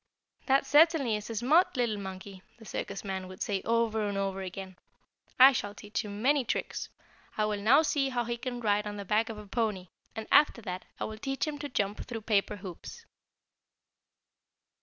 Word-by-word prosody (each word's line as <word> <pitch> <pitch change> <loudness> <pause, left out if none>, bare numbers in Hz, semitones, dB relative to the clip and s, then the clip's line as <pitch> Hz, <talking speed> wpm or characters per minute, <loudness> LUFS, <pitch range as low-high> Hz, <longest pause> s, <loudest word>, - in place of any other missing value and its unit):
"That 270 0 +4
certainly 295 -6 +4
is 210 +1 -6
a 230 - -4
smart 290 - +3
little 230 -4 0
monkey!" 190 0 -8 0.2
the 225 - -14
circus 200 -1 -5
man 190 -2 -4
would 185 0 -5
say 195 -2 -1
over 225 -2 +1
and 200 - -3
over 195 -1 -2
again. 190 0 -7 0.6
"I 265 +2 +10
shall 205 -5 -3
teach 210 +3 -4
him 205 +1 -7
many 285 +1 +4
tricks. - - -3 0.5
I 215 - +2
will 210 -1 -2
now 265 +9 +6
see 280 -3 +1
how 245 -2 -1
he 235 0 -2
can 245 0 -5
ride 210 -1 +1
on 205 0 -5
the 200 - -6
back 215 +4 +1
of 220 - -6
a 210 - -9
pony, 205 -4 -2 0.3
and, 220 - -5
after 295 -4 +5
that, 185 -1 -5
I - - -2
will 215 0 -5
teach 270 +2 -2
him 300 -2 -4
to 290 0 -5
jump 205 -4 -1
through 230 -3 -6
paper 210 -1 +1
hoops." 200 - -9
215 Hz, 195 wpm, -30 LUFS, 200-250 Hz, 0.6 s, I